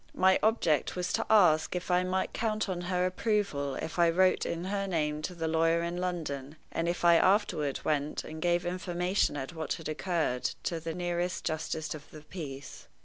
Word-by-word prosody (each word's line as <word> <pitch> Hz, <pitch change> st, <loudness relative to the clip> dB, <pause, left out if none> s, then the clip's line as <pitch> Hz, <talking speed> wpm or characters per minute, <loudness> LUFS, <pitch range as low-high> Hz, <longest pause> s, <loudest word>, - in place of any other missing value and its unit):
My 190 Hz, 0 st, +4 dB
object 190 Hz, -, +2 dB
was 180 Hz, 0 st, -2 dB
to 225 Hz, -, 0 dB
ask 180 Hz, -7 st, +5 dB
if 180 Hz, +1 st, -3 dB
I 180 Hz, 0 st, +4 dB
might 185 Hz, +1 st, -1 dB
count 215 Hz, -2 st, -1 dB
on 180 Hz, -2 st, -3 dB
her 180 Hz, 0 st, 0 dB
approval 185 Hz, -, 0 dB
if 160 Hz, +2 st, -5 dB
I 170 Hz, -1 st, +6 dB
wrote 185 Hz, +2 st, +3 dB
in 170 Hz, 0 st, -3 dB
her 195 Hz, +1 st, -2 dB
name 150 Hz, -4 st, -1 dB
to 180 Hz, +3 st, -4 dB
the 165 Hz, -1 st, -2 dB
lawyer 165 Hz, +1 st, +2 dB
in 170 Hz, +1 st, -3 dB
London, 155 Hz, -6 st, -3 dB, 0.2 s
and 165 Hz, +1 st, -1 dB
if 175 Hz, 0 st, -2 dB
I 170 Hz, -1 st, +7 dB
afterward 165 Hz, -7 st, +2 dB
went 150 Hz, -1 st, 0 dB
and 155 Hz, 0 st, -8 dB
gave 175 Hz, 0 st, +1 dB
information 180 Hz, -1 st, 0 dB
of 135 Hz, +5 st, -5 dB
what 160 Hz, -2 st, -2 dB
had 165 Hz, -, -6 dB
occurred 155 Hz, -5 st, -1 dB
to 170 Hz, -, -2 dB
the 165 Hz, 0 st, -5 dB
nearest 175 Hz, 0 st, -2 dB
justice 155 Hz, -1 st, -2 dB
of 150 Hz, -1 st, -10 dB
the 155 Hz, -, -11 dB
peace. 145 Hz, -4 st, -8 dB
170 Hz, 195 wpm, -30 LUFS, 155-185 Hz, 0.2 s, I